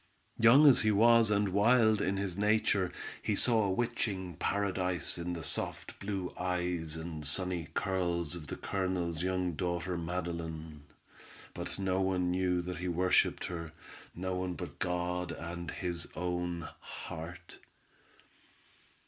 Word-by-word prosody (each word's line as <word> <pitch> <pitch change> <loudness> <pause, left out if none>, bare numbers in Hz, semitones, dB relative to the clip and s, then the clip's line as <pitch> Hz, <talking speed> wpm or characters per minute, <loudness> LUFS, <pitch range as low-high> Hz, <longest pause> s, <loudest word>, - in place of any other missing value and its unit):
Young 120 +7 +8
as 140 -4 +8
he 110 - +3
was 115 +2 +6
and 105 -1 +2
wild 110 +2 +4
in 95 +1 0
his 95 -3 -2
nature, 100 -2 +2 0.3
he 105 - 0
saw 115 -1 +4
a - - 0
witching 100 -5 -1
paradise 95 -1 0
in 90 +1 -3
the 85 -2 -5
soft - - -1
blue 100 -3 -3
eyes 90 -3 -1
and 80 -1 -6
sunny 85 +2 -1
curls 85 -4 0
of 85 -4 -7
the - - -4
Colonel's 90 -4 -2
young 90 -1 0
daughter 90 +1 -2
Madeline, 80 -3 -4 0.7
but - - -5
no 95 -1 0
one 90 -2 +1
knew 90 -1 +1
that 90 -1 -4
he 90 +2 -3
worshiped 90 +1 +2
her, 85 -2 -5 0.4
no 95 +2 -2
one 90 -1 -2
but 85 -6 -7
God 90 -1 -1
and 85 +1 -6
his 85 -1 -3
own 90 -1 -2
heart. 85 +2 -8
90 Hz, 140 wpm, -32 LUFS, 85-95 Hz, 0.7 s, Young